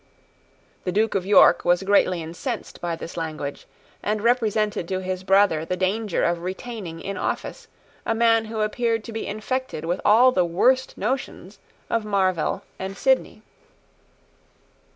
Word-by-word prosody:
The 180 - -2
Duke 215 +4 +1
of 190 -1 -1
York 205 - +6
was 175 +2 +2
greatly 185 -3 +2
incensed 190 - -6
by 170 -1 -2
this 165 +1 -9
language, 155 -3 -5 0.3
and 210 +1 -1
represented 215 -6 +1
to 185 - -1
his 185 0 -4
brother 190 -4 +3
the 180 +3 -3
danger 195 +2 0
of 170 0 +1
retaining 185 -2 -6
in 195 -1 -5
office - - -4 0.4
a 225 - -1
man 225 -1 +3
who 220 0 -4
appeared 225 +1 0
to 230 - -8
be 225 - -4
infected 215 - -3
with 175 +3 -2
all 235 +5 +6
the 185 -7 +2
worst 250 +10 +1
notions 215 -4 -4 0.3
of 230 -1 0
Marvell 190 -5 0 0.2
and 190 +1 -5
Sidney. 260 -4 +1
200 Hz, 150 wpm, -23 LUFS, 180-225 Hz, 0.4 s, York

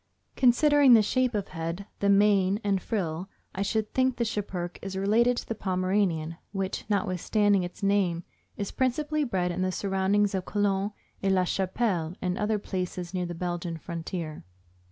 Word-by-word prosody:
Considering 275 +1 +6
the 220 - +6
shape 255 +2 +1
of 205 -2 -2
head, 165 +3 -4
the 200 - +2
mane 200 -1 +4
and 200 -2 +1
frill, 180 -3 -3 0.2
I 190 - -4
should 215 +1 -1
think 260 -1 +2
the 235 - +1
Schipperke 190 -5 -4
is 190 0 -5
related 230 +5 +3
to - - -4
the - - -1
Pomeranian, 185 -5 0 0.2
which, 195 -1 -3
notwithstanding 205 0 +2
its 175 +2 -7
name, 195 -4 +2 0.3
is 200 -2 -3
principally 300 +4 0
bred 185 -8 0
in 180 - -3
the 185 0 +1
surroundings 195 +1 +1
of 190 -1 -1
Cologne, 200 -1 0 0.3
Aix 195 - +1
la 185 -1 +3
Chapelle, 185 -2 -1
and 180 -1 -1
other 210 +2 0
places 180 -3 -4
near 180 -1 -1
the 175 - -5
Belgian 175 -1 -3
frontier. 165 -1 -5
195 Hz, 165 wpm, -27 LUFS, 180-210 Hz, 0.3 s, Considering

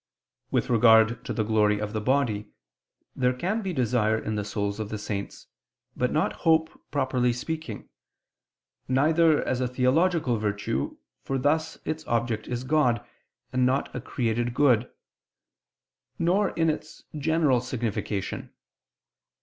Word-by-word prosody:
With - - 0
regard 115 0 +5
to - - -3
the 110 - 0
glory 105 -1 +2
of 105 0 -4
the 110 - -2
body, 110 -4 0 0.7
there 125 0 +2
can 190 - -1
be 190 -3 -3
desire 120 -6 +1
in 110 -1 -3
the 105 -1 -1
souls 100 0 -3
of 110 -2 -4
the 110 - -4
saints, 105 -1 -5 0.5
but - - 0
not - - +1
hope, 160 -1 +3 0.2
properly 130 -3 +1
speaking; 160 +6 -5 1.0
neither 155 +4 +3
as 130 0 0
a 125 - +1
theological 130 +2 +2
virtue, 100 -10 -2 0.3
for 135 - -2
thus 150 +4 0
its 155 0 -3
object 115 -2 -1
is 125 0 -3
God, 125 -4 +2 0.5
and 130 0 +2
not 130 +2 0
a - - -3
created 120 0 -1
good; 125 -5 +3 1.3
nor 185 +5 +2
in 165 -1 0
its 155 +1 -8
general 150 -4 +2
signification. 110 -5 -3
125 Hz, 135 wpm, -26 LUFS, 110-150 Hz, 1.3 s, regard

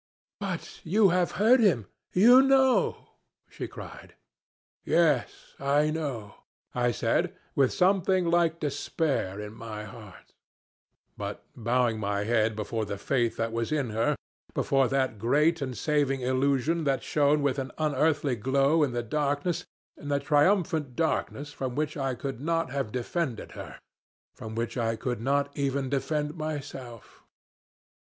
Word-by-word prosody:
'But 195 -4 -5
you 200 +4 +4
have 180 0 +1
heard 230 +6 +5
him! 170 - +3 0.3
You 240 +8 +7
know!' 270 -1 +3 0.4
she - - -6
cried. - - -11 0.7
"'Yes, 155 -7 +1
I 145 +2 +2
know,' 140 -10 -4 0.4
I 120 0 +1
said 120 - 0 0.2
with 135 -2 +3
something 185 0 +2
like 170 -1 +2
despair 140 - -1
in 105 0 -7
my 110 -2 -7
heart, 110 -4 -13 0.8
but - - -6
bowing 120 -1 +1
my 100 -1 -1
head 110 0 +1
before 110 +1 -3
the 100 -1 -4
faith 120 +2 0
that 115 0 -1
was 115 +2 -2
in 140 -7 0
her, 110 +2 +1 0.4
before 135 -2 +2
that 130 -5 0
great 150 +8 +2
and 130 -4 -4
saving 140 0 +1
illusion 135 +5 +1
that 135 -2 +1
shone 145 0 +2
with 140 0 +1
an 130 -1 -4
unearthly 150 -2 +1
glow 135 +7 +2
in 140 -5 +1
the 120 0 -1
darkness, 145 +7 -1 0.3
in 145 - -11
the 140 -1 +1
triumphant 155 -3 +2
darkness 145 -2 -1
from 130 -3 -4
which 155 +1 -1
I 135 -3 -1
could 135 -1 -5
not 165 +2 0
have 135 -6 -2
defended 125 +1 -3
her - - -9 0.6
from 110 0 -8
which 115 +2 -3
I 115 -1 0
could 120 0 -3
not 140 +2 0
even 140 -1 -1
defend 150 +2 -1
myself. 135 -7 -7
140 Hz, 145 wpm, -28 LUFS, 120-155 Hz, 0.8 s, You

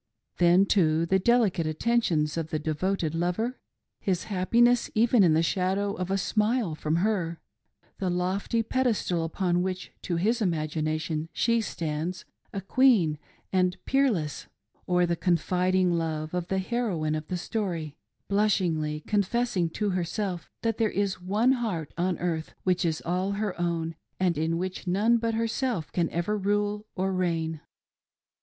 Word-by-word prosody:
' - - -48
Then, 175 +2 +5
too, 165 -5 +3
the 190 +3 +2
delicate 205 -7 +2
attentions 155 -3 +1
of 165 -1 -3
the 155 - -1
devoted 160 +2 -1
lover 180 +9 -1 0.2
— - - -57
his 180 -1 +1
happiness 235 +5 +3
even 230 0 +5
in 165 -3 +5
the 160 - +3
shadow 195 +3 0
of 185 -1 -4
a 195 - +1
smile 215 -1 +1
from 155 +1 -1
her, 170 -3 0 0.3
— - - -38
the 190 -3 0
lofty 185 +6 0
pedestal 225 -9 0
upon 175 +2 0
which 185 0 -3
to 175 - -2
his 220 +8 +1
imagination 155 -2 -1
she 230 -1 +2
stan'ds, 170 -1 -3 0.3
a 200 - -4
queen 195 - +3 0.3
and 180 -1 +2
peer 275 +1 +3
less; 155 - -3 0.2
— - - -40
or 180 0 +3
the 170 0 0
confiding 180 +1 +2
love 160 -1 -2
of 180 -1 -2
the 190 - -1
heroine 190 -7 -1
of 155 0 -3
the 180 - -2
story 175 -7 -3 0.3
^ - - -55
blushingly 175 -7 +1
confessing 205 -2 0
to 205 +4 -1
herself 180 +1 -2
that 225 -1 0
there 225 -2 +3
is 200 -3 -1
one 210 +7 +2
heart 215 - -2
on 180 +1 0
earth 165 -3 -3
which 180 -1 +1
is 160 -2 -1
all 185 +3 0
her 205 -1 -2
own 165 -1 -1 0.3
and 180 -2 +2
in 160 +2 0
which 185 +1 -4
none 210 +6 +3
but 230 -1 -1
herself 230 - -1
can 170 -2 0
ever 175 +5 -1
rule 205 +1 -1
or 190 +1 0
reign. 165 -4 -1
185 Hz, 165 wpm, -27 LUFS, 165-210 Hz, 0.3 s, Then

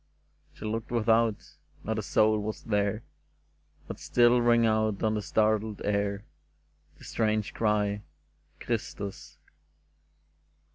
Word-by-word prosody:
She - - -9
looked 110 +1 -3
without: 115 -1 +3 0.5
not 110 0 -2
a - - -1
soul 110 +1 +2
was 105 0 -5
there, 105 0 0 0.8
But - - -7
still 120 0 +4
rang 120 -1 +4
out 110 -2 +1
on 110 0 +2
the 105 - -1
startled 110 0 0
air 100 0 -1 0.7
The - - -16
strange 110 -2 -1
cry, 105 -2 0 0.6
'^ - - -11
Christus!" 80 -8 -4
110 Hz, 115 wpm, -28 LUFS, 105-110 Hz, 0.8 s, still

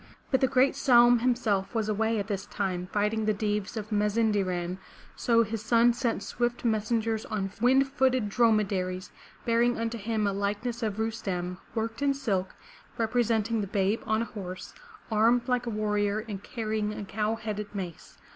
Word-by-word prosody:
But 265 - +3
the 265 - +5
great 265 +1 +3
Saum 240 -3 +6
him 245 +1 +2
self 210 -4 -1
was 220 -2 0
away 220 +1 +1
at 200 - -1
this 200 -2 -4
time, 185 -3 -2
fighting 210 +1 0
the 215 -1 +2
Deevs 210 +1 -2
of 215 0 -5
Maz 210 +1 +1
in' 225 -1 +3
de 205 -1 +2
ran, 180 -1 -3 0.4
so 230 -1 +3
his 220 0 -4
son 235 +1 +4
sent 235 -4 -1
swift 240 +3 -2
messengers 220 0 0
on 195 -3 -3
wind 265 +3 +4
footed 260 -4 +1
dromedaries 200 -4 +1 0.3
bearing 235 +1 +2
unto 230 0 -2
him 215 0 -1
a 200 - +1
likeness 205 +4 -2
of 215 -3 -2
Rustem 190 -5 -3 0.2
worked 225 +2 -3
in 280 -1 +2
silk, 195 -9 -2 0.4
representing 225 -1 +1
the 200 - -3
babe 200 +2 0
on 220 +1 +2
a 230 - -10
horse, 185 -3 -7 0.4
armed 235 +3 +3
like 250 -1 0
a - - 0
warrior 210 0 0
and 200 -3 -5
carrying 215 -2 -2
a 210 - -6
cow 215 +2 -1
headed 215 -2 -4
mace. 180 -4 -7
220 Hz, 180 wpm, -28 LUFS, 205-235 Hz, 0.4 s, Saum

